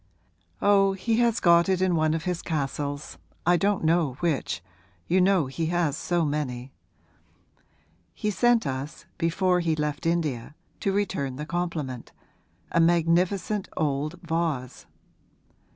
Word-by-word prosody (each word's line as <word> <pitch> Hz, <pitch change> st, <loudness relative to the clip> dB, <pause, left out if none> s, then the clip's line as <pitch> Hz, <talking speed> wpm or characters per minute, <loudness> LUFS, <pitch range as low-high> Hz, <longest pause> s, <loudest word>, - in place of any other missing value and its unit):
'Oh, 195 Hz, -1 st, +5 dB
he 220 Hz, +4 st, 0 dB
has 235 Hz, -1 st, +2 dB
got 170 Hz, +1 st, +5 dB
it 190 Hz, -1 st, +2 dB
in 185 Hz, -2 st, +2 dB
one 155 Hz, 0 st, +2 dB
of 165 Hz, -, -3 dB
his 180 Hz, -1 st, -2 dB
castles; 145 Hz, -1 st, -3 dB, 0.3 s
I 175 Hz, +1 st, +5 dB
don't 195 Hz, +2 st, +1 dB
know 160 Hz, -4 st, +2 dB
which 150 Hz, -, -1 dB, 0.4 s
you 185 Hz, +2 st, +3 dB
know 185 Hz, -4 st, +3 dB
he 155 Hz, +5 st, -3 dB
has 170 Hz, -4 st, +1 dB
so 175 Hz, +1 st, 0 dB
many. 135 Hz, -4 st, -3 dB, 1.4 s
He 210 Hz, -, -1 dB
sent 240 Hz, +1 st, +3 dB
us, 135 Hz, +2 st, -5 dB
before 180 Hz, +2 st, +2 dB
he 165 Hz, -2 st, +1 dB
left 150 Hz, +1 st, -2 dB
India 150 Hz, -6 st, -1 dB, 0.2 s
to 195 Hz, -, 0 dB
return 190 Hz, -10 st, -1 dB
the 150 Hz, +3 st, -5 dB
compliment 160 Hz, -7 st, -4 dB, 0.6 s
a -, -, +2 dB
magnificent 175 Hz, +4 st, +2 dB
old 150 Hz, +1 st, -1 dB
vase.' 160 Hz, -7 st, -2 dB
165 Hz, 135 wpm, -26 LUFS, 150-185 Hz, 1.4 s, Oh